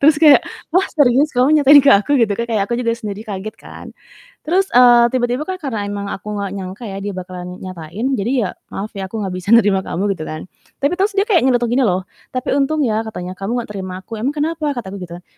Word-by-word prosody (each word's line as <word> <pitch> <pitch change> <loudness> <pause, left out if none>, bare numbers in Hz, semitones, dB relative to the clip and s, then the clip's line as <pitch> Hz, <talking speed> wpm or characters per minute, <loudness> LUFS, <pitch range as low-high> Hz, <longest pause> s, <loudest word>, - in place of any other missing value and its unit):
terus 300 +1 +6
kayak, 295 -3 +8 0.3
"Wah, 375 +3 +3
serius 285 0 +3
kamu 280 +5 +4
nyatain 285 +1 +8
ke 280 - +6
aku?" 210 +9 +3
Gitu 220 -3 +2
kan. 235 - -1
Kayak 215 -3 +1
aku 235 - -1
juga 230 - 0
sendiri 210 -3 -6
kaget 205 0 -6
kan, - - -11 0.6
terus, 375 +4 +2
eee, 240 -1 +7
tiba-tiba 250 +2 0
kan 375 - -2
karena 225 -8 -3
emang 200 0 -4
aku 205 - -7
enggak 200 -1 -3
nyangka 190 +4 -7
ya 195 - -6
dia 205 - -4
bakalan 180 0 -7
nyatain 185 +4 -6
jadi 220 +5 -1 0.2
ya, - - -6 0.3
"Maaf 205 +2 -5
ya 195 -1 -4
aku 225 - -4
enggak 190 -2 -4
bisa 185 +3 -8
nerima 205 -4 +4
kamu." 185 +2 -3
Gitu 155 - -7
kan, 155 0 -6 0.4
tapi 280 - +3
terus 405 +1 +1
dia 395 - +4
kayak 370 -7 +4
nyeletuk 245 -2 +2
gini 260 +2 +2
loh, 185 -1 0 0.3
"Tapi 255 - -2
untung 295 +2 +1
ya," 220 -1 0
katanya 180 -4 -6
"kamu 195 +3 -3
enggak 230 - -11
terima 190 -2 -6
aku." 225 +2 -7
"Emang 275 +7 -2
kenapa?" 305 -1 -1
Kata 205 -5 -5
aku 200 - -7
gitu 170 -1 -9
kan, - - -25
225 Hz, 240 wpm, -18 LUFS, 195-275 Hz, 0.6 s, kayak